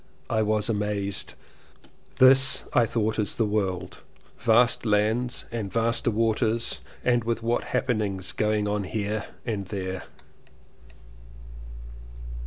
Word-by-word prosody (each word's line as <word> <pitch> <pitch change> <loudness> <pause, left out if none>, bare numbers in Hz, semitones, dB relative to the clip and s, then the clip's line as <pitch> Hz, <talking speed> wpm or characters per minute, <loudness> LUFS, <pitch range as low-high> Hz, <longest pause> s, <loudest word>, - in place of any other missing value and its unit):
I 110 -1 +2
was 105 -1 0
amazed. 105 -2 -2 0.8
This 130 0 +7
I 120 -2 +4
thought 110 0 -1
is 105 - -1
the 115 - +1
world: 95 -4 -2 0.4
vast 115 +1 +3
lands 110 +3 0
and 110 -5 -4
vaster 115 +1 +2
waters 115 +1 0 0.2
and 120 -1 +2
with 115 0 -2
what 120 +1 0
happenings 105 -7 -1
going 105 -1 0
on 105 -1 -1
here 105 +1 -3 0.2
and 105 -5 -3
there! 95 -2 -5
110 Hz, 110 wpm, -25 LUFS, 105-115 Hz, 0.8 s, This